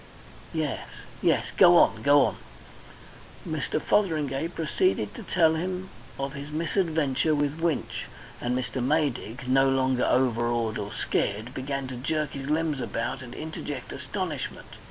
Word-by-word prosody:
Yes -, -, -2 dB, 0.3 s
yes. -, -, +2 dB
Go 175 Hz, -2 st, +8 dB
on. 110 Hz, -9 st, +4 dB
Go 140 Hz, +2 st, +6 dB
on!" 110 Hz, -, -2 dB, 1.1 s
Mr. -, -, -1 dB
Fotheringay 155 Hz, -7 st, +1 dB
proceeded 175 Hz, -, 0 dB
to -, -, -8 dB
tell 160 Hz, -3 st, +3 dB, 0.6 s
of 135 Hz, 0 st, -3 dB
his 140 Hz, 0 st, -7 dB
misadventure 160 Hz, -2 st, +1 dB
with 145 Hz, +1 st, 0 dB
Winch, 165 Hz, -2 st, -1 dB, 0.4 s
and 125 Hz, +1 st, 0 dB
Mr. 130 Hz, 0 st, -2 dB
Maydig, 130 Hz, -4 st, 0 dB
no 135 Hz, +1 st, +4 dB
longer 130 Hz, -1 st, +2 dB
overawed 120 Hz, -3 st, +1 dB
or 105 Hz, 0 st, -4 dB
scared, 110 Hz, +5 st, -1 dB
began 135 Hz, +1 st, -3 dB
to 130 Hz, -1 st, -6 dB
jerk 150 Hz, +4 st, -1 dB
his 135 Hz, 0 st, -6 dB
limbs 155 Hz, -2 st, +1 dB
about 120 Hz, +4 st, -3 dB
and 125 Hz, -1 st, -9 dB
interject 150 Hz, -4 st, -6 dB
astonishment. 180 Hz, -9 st, -4 dB
140 Hz, 135 wpm, -27 LUFS, 125-160 Hz, 1.1 s, Go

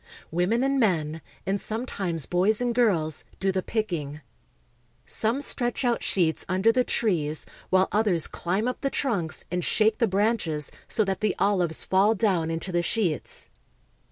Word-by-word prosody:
Women 180 Hz, +9 st, +1 dB
and 275 Hz, 0 st, +1 dB
men, 165 Hz, -, +1 dB, 0.2 s
and 195 Hz, +1 st, -1 dB
sometimes 195 Hz, -, -2 dB
boys 190 Hz, +5 st, +2 dB
and 245 Hz, -1 st, 0 dB
girls, 175 Hz, -11 st, +1 dB, 0.2 s
do 195 Hz, 0 st, +1 dB
the 190 Hz, 0 st, -1 dB
picking. 170 Hz, -10 st, -3 dB, 0.8 s
Some 230 Hz, +6 st, 0 dB
stretch 245 Hz, -2 st, -1 dB
out 240 Hz, -1 st, +1 dB
sheets 165 Hz, -4 st, +1 dB
under 190 Hz, +4 st, +3 dB
the 250 Hz, +2 st, +2 dB
trees, 160 Hz, -12 st, 0 dB, 0.2 s
while 185 Hz, 0 st, +4 dB
others 205 Hz, -6 st, +2 dB
climb 190 Hz, +7 st, -1 dB
up 250 Hz, -, -3 dB
the 275 Hz, -, 0 dB
trunks 200 Hz, -, -2 dB
and 180 Hz, 0 st, -1 dB
shake 215 Hz, 0 st, +2 dB
the 230 Hz, -, +3 dB
branches 195 Hz, -7 st, 0 dB, 0.2 s
so 215 Hz, -, +1 dB
that 195 Hz, -1 st, -2 dB
the 215 Hz, -2 st, +1 dB
olives 180 Hz, -5 st, +1 dB
fall 200 Hz, +4 st, +3 dB
down 185 Hz, -6 st, +1 dB
into 165 Hz, +3 st, -3 dB
the 175 Hz, -1 st, +1 dB
sheets. 175 Hz, -4 st, -1 dB
195 Hz, 155 wpm, -26 LUFS, 170-225 Hz, 0.8 s, while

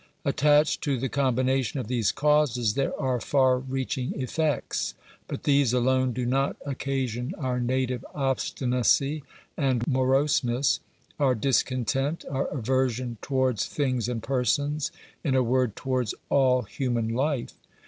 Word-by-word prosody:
Attached 150 Hz, +1 st, +3 dB
to 140 Hz, -3 st, 0 dB
the 130 Hz, +2 st, -2 dB
combination 130 Hz, 0 st, +1 dB
of 125 Hz, -, -4 dB
these 120 Hz, -4 st, +1 dB
causes 145 Hz, -7 st, +2 dB
there 135 Hz, +3 st, -1 dB
are 130 Hz, -3 st, 0 dB
far 130 Hz, -1 st, +3 dB
reaching 130 Hz, 0 st, -3 dB
effects; 145 Hz, +2 st, -1 dB, 0.3 s
but -, -, -6 dB
these 140 Hz, -4 st, +3 dB
alone 130 Hz, +1 st, +2 dB
do 125 Hz, +1 st, -3 dB
not 135 Hz, +3 st, +1 dB
occasion 135 Hz, -, -2 dB
our 130 Hz, -5 st, -1 dB
native 125 Hz, 0 st, -1 dB
obstinacy 135 Hz, +1 st, +1 dB, 0.3 s
and 130 Hz, -5 st, +1 dB
moroseness, 130 Hz, -1 st, +2 dB, 0.4 s
our 135 Hz, -3 st, +3 dB
discontent, 135 Hz, +4 st, 0 dB
our 135 Hz, 0 st, -1 dB
aversion 125 Hz, -2 st, -1 dB
towards 130 Hz, -5 st, 0 dB
things 130 Hz, -5 st, -1 dB
and 115 Hz, -3 st, -3 dB
persons 140 Hz, +4 st, 0 dB, 0.2 s
— -, -, -29 dB
in 135 Hz, -4 st, +1 dB
a 130 Hz, -, +4 dB
word, 125 Hz, -2 st, +1 dB
towards 130 Hz, -4 st, -1 dB
all 130 Hz, -2 st, +3 dB
human 120 Hz, 0 st, -2 dB
life. 130 Hz, +2 st, -1 dB
130 Hz, 130 wpm, -26 LUFS, 125-140 Hz, 0.4 s, a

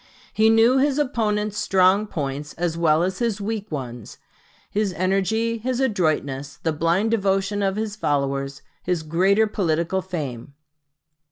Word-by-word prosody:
He 220 Hz, +1 st, +4 dB
knew 230 Hz, +4 st, +5 dB
his 280 Hz, 0 st, +2 dB
opponent's 215 Hz, -6 st, 0 dB
strong 190 Hz, +2 st, +3 dB
points 145 Hz, -3 st, -4 dB
as 170 Hz, -1 st, -2 dB
well 165 Hz, -1 st, +3 dB
as 185 Hz, +1 st, -2 dB
his 230 Hz, -4 st, 0 dB
weak 210 Hz, -1 st, -4 dB
ones 120 Hz, -6 st, -6 dB, 0.5 s
his 205 Hz, -2 st, 0 dB
energy, 195 Hz, +5 st, 0 dB
his 250 Hz, +2 st, -2 dB
adroitness, 155 Hz, -, -1 dB
the 160 Hz, -, +1 dB
blind 170 Hz, +8 st, +1 dB
devotion 195 Hz, -1 st, +1 dB
of 195 Hz, -1 st, 0 dB
his 215 Hz, -1 st, -3 dB
followers, 140 Hz, -5 st, -2 dB, 0.2 s
his 175 Hz, -3 st, -1 dB
greater 190 Hz, +7 st, +3 dB
political 180 Hz, -3 st, 0 dB
fame. 140 Hz, -8 st, -6 dB
190 Hz, 140 wpm, -23 LUFS, 155-215 Hz, 0.5 s, knew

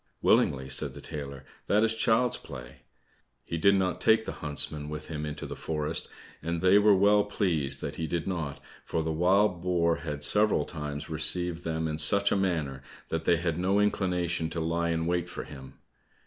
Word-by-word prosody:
"Willingly," 65 Hz, -1 st, +2 dB
said 70 Hz, 0 st, -1 dB
the -, -, -9 dB
tailor, 70 Hz, -3 st, -7 dB, 0.2 s
"that 105 Hz, +2 st, +3 dB
is 115 Hz, 0 st, +2 dB
child's 115 Hz, +2 st, +2 dB
play!" 60 Hz, -5 st, -10 dB, 0.7 s
He 85 Hz, -, -3 dB
did 100 Hz, +4 st, +5 dB
not 90 Hz, -2 st, -1 dB
take 110 Hz, 0 st, +3 dB
the -, -, -4 dB
huntsmen 75 Hz, 0 st, -1 dB
with 75 Hz, 0 st, -7 dB
him 75 Hz, -2 st, -4 dB
into 75 Hz, -1 st, -6 dB
the -, -, -6 dB
forest, 75 Hz, -2 st, -2 dB, 0.3 s
and 85 Hz, +2 st, -3 dB
they 95 Hz, +3 st, +5 dB
were 105 Hz, -1 st, +5 dB
well 100 Hz, +2 st, +4 dB
pleased 80 Hz, -10 st, -1 dB
that -, -, -5 dB
he 80 Hz, -, -3 dB
did 85 Hz, 0 st, -2 dB
not, 80 Hz, -6 st, -4 dB, 0.2 s
for 80 Hz, -, -2 dB
the 80 Hz, -, -2 dB
wild 90 Hz, +3 st, +2 dB
boar 85 Hz, -2 st, +1 dB
had 75 Hz, -3 st, -6 dB
several 105 Hz, -2 st, +2 dB
times 75 Hz, -2 st, -6 dB
received 85 Hz, +2 st, +1 dB
them 80 Hz, 0 st, -2 dB
in 75 Hz, 0 st, -4 dB
such 100 Hz, +6 st, +6 dB
a -, -, +3 dB
manner 80 Hz, -8 st, -1 dB, 0.3 s
that 80 Hz, 0 st, -3 dB
they 85 Hz, -, +4 dB
had 85 Hz, -1 st, -2 dB
no 95 Hz, +3 st, +1 dB
inclination 90 Hz, -5 st, 0 dB
to 85 Hz, -, -4 dB
lie 85 Hz, +1 st, -1 dB
in 80 Hz, -1 st, -1 dB
wait 85 Hz, 0 st, -1 dB
for -, -, -6 dB
him. 65 Hz, -2 st, -11 dB
85 Hz, 190 wpm, -28 LUFS, 75-95 Hz, 0.7 s, such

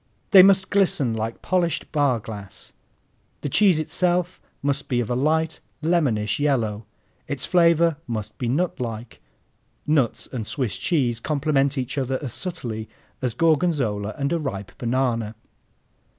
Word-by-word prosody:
They 195 Hz, -3 st, +10 dB
must 190 Hz, 0 st, +4 dB
glisten 175 Hz, -, +2 dB
like 110 Hz, +1 st, -4 dB
polished 175 Hz, -4 st, 0 dB
bar 140 Hz, -6 st, +2 dB
glass. 100 Hz, -3 st, -8 dB, 0.7 s
The 145 Hz, -, -3 dB
cheese 190 Hz, -1 st, +4 dB
itself 175 Hz, +3 st, 0 dB, 0.2 s
must 140 Hz, 0 st, -1 dB
be 125 Hz, -3 st, 0 dB
of 120 Hz, -1 st, -2 dB
a -, -, +1 dB
light, 160 Hz, +4 st, +1 dB, 0.2 s
lemonish 130 Hz, -11 st, +1 dB
yellow. 115 Hz, -7 st, 0 dB, 0.4 s
Its 140 Hz, -3 st, -2 dB
flavor 170 Hz, -2 st, +4 dB
must 110 Hz, -3 st, -4 dB
be 120 Hz, -, -1 dB
nutlike. 120 Hz, -7 st, -3 dB, 0.6 s
(Nuts 145 Hz, -6 st, +1 dB
and 115 Hz, -5 st, -4 dB
Swiss 125 Hz, -9 st, -2 dB
cheese 125 Hz, -9 st, +1 dB
complement 140 Hz, 0 st, +1 dB
each 130 Hz, +2 st, -2 dB
other 130 Hz, 0 st, -1 dB
as 135 Hz, -6 st, -5 dB
subtly 120 Hz, -, -4 dB, 0.3 s
as 125 Hz, -3 st, -2 dB
Gorgonzola 140 Hz, -, +1 dB
and 140 Hz, +2 st, -1 dB
a 170 Hz, -, +1 dB
ripe 100 Hz, -10 st, -5 dB
banana.) 120 Hz, -3 st, 0 dB
135 Hz, 135 wpm, -23 LUFS, 115-160 Hz, 0.7 s, They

